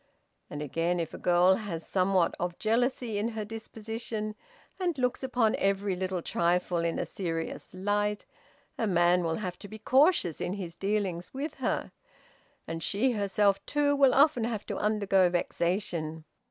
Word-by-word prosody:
And 145 Hz, 0 st, -5 dB
again, 165 Hz, +4 st, 0 dB
if 165 Hz, -, -3 dB
a -, -, -7 dB
girl 180 Hz, +1 st, +5 dB
has 175 Hz, -7 st, -5 dB
somewhat 185 Hz, -2 st, +2 dB
of 175 Hz, 0 st, -2 dB
jealousy 230 Hz, -1 st, 0 dB
in 215 Hz, -, 0 dB
her 220 Hz, -2 st, -4 dB
disposition, 220 Hz, 0 st, -5 dB, 0.5 s
and 350 Hz, -5 st, 0 dB
looks 250 Hz, -1 st, 0 dB
upon 250 Hz, -4 st, +2 dB
every 195 Hz, 0 st, +1 dB
little 185 Hz, -1 st, -2 dB
trifle 175 Hz, 0 st, +1 dB
in 170 Hz, 0 st, 0 dB
a -, -, -1 dB
serious 165 Hz, -1 st, -4 dB
light, 205 Hz, +2 st, 0 dB, 0.5 s
a 225 Hz, -, +1 dB
man 175 Hz, -1 st, +3 dB
will 165 Hz, -1 st, 0 dB
have 180 Hz, -2 st, -5 dB
to -, -, -9 dB
be 215 Hz, -, -9 dB
cautious 260 Hz, -, +3 dB
in 180 Hz, -, -1 dB
his 180 Hz, -4 st, -6 dB
dealings 195 Hz, -2 st, -2 dB
with 285 Hz, +4 st, -3 dB
her, -, -, -1 dB, 0.8 s
and 165 Hz, 0 st, -4 dB
she 220 Hz, +9 st, +1 dB
herself, 200 Hz, -2 st, +1 dB
too, 290 Hz, -1 st, +2 dB
will 275 Hz, -2 st, +5 dB
often 280 Hz, -4 st, +5 dB
have 225 Hz, -3 st, -3 dB
to -, -, -4 dB
undergo 200 Hz, -3 st, +3 dB
vexation. 170 Hz, -2 st, -1 dB
200 Hz, 160 wpm, -29 LUFS, 175-225 Hz, 0.8 s, girl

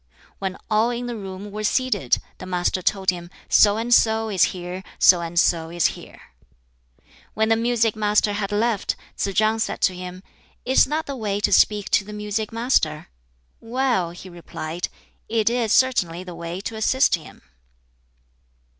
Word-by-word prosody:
When 190 Hz, -1 st, -3 dB
all 215 Hz, +2 st, +2 dB
in 245 Hz, 0 st, -3 dB
the 240 Hz, -1 st, -4 dB
room 195 Hz, -1 st, -8 dB
were 215 Hz, +1 st, -5 dB
seated, 210 Hz, -, +1 dB, 0.2 s
the 185 Hz, -, -8 dB
Master 180 Hz, 0 st, -1 dB
told 190 Hz, 0 st, +1 dB
him 175 Hz, -1 st, -8 dB, 0.2 s
"So 205 Hz, 0 st, +5 dB
and 235 Hz, +2 st, 0 dB
so 220 Hz, -1 st, +3 dB
is 190 Hz, -3 st, +4 dB
here, 180 Hz, +1 st, -6 dB
so 180 Hz, -2 st, +6 dB
and 170 Hz, 0 st, -1 dB
so 165 Hz, -2 st, +2 dB
is 170 Hz, -1 st, 0 dB
here." -, -, -13 dB, 1.2 s
When 220 Hz, 0 st, +1 dB
the 225 Hz, -, +5 dB
music 230 Hz, -1 st, +1 dB
master 210 Hz, -1 st, +2 dB
had 205 Hz, -1 st, -3 dB
left, 210 Hz, 0 st, 0 dB, 0.2 s
Tsz 195 Hz, -1 st, -2 dB
chang 220 Hz, +2 st, +2 dB
said 225 Hz, -, -2 dB
to 185 Hz, -, +3 dB
him, 180 Hz, +1 st, -8 dB, 0.4 s
"Is 260 Hz, +2 st, +5 dB
that 310 Hz, +3 st, -2 dB
the 280 Hz, -, -5 dB
way 205 Hz, -4 st, -2 dB
to -, -, +2 dB
speak 205 Hz, +1 st, +3 dB
to -, -, +3 dB
the 210 Hz, +2 st, -10 dB
music 210 Hz, +1 st, -3 dB
master?" 225 Hz, -10 st, 0 dB, 0.5 s
"Well," 235 Hz, -6 st, 0 dB
he 175 Hz, +2 st, -11 dB
replied, 170 Hz, -1 st, -6 dB, 0.4 s
"it 225 Hz, 0 st, +2 dB
is 235 Hz, -3 st, 0 dB
certainly 185 Hz, -11 st, +2 dB
the 180 Hz, -1 st, -9 dB
way 170 Hz, +2 st, -6 dB
to 220 Hz, -, -5 dB
assist 260 Hz, +5 st, +2 dB
him." 165 Hz, -3 st, -4 dB
205 Hz, 170 wpm, -23 LUFS, 180-225 Hz, 1.2 s, so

